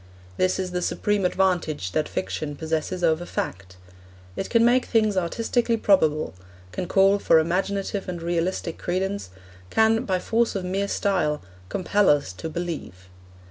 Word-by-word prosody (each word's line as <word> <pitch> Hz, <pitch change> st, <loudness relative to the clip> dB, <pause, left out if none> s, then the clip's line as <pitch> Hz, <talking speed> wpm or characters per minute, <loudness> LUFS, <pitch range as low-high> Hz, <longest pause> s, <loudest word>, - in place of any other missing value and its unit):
This 185 Hz, 0 st, +2 dB
is 185 Hz, -1 st, -3 dB
the 180 Hz, 0 st, -2 dB
supreme 205 Hz, +2 st, 0 dB
advantage 175 Hz, -, 0 dB
that 155 Hz, -, -1 dB
fiction 95 Hz, +11 st, -3 dB
possesses 160 Hz, +4 st, -3 dB
over 165 Hz, 0 st, +2 dB
fact. 95 Hz, -, -5 dB, 0.6 s
It -, -, -4 dB
can 230 Hz, -1 st, +4 dB
make 250 Hz, +1 st, +4 dB
things 215 Hz, -3 st, +2 dB
artistically 230 Hz, +6 st, 0 dB
probable; 160 Hz, -, +2 dB, 0.4 s
can 180 Hz, -, -4 dB
call 195 Hz, +2 st, +4 dB
for 165 Hz, -, +4 dB
imaginative 195 Hz, +4 st, -1 dB
and 175 Hz, -1 st, -4 dB
realistic 170 Hz, 0 st, -2 dB
credence; 190 Hz, -, -2 dB, 0.4 s
can, 225 Hz, 0 st, +3 dB
by 190 Hz, -2 st, +1 dB
force 230 Hz, +5 st, 0 dB
of 190 Hz, -2 st, -2 dB
mere 195 Hz, +2 st, -1 dB
style, 175 Hz, -8 st, 0 dB, 0.3 s
compel 200 Hz, +2 st, +2 dB
us 145 Hz, -10 st, +2 dB
to 160 Hz, -, -6 dB
believe. 155 Hz, -, -6 dB
180 Hz, 145 wpm, -24 LUFS, 160-200 Hz, 0.6 s, can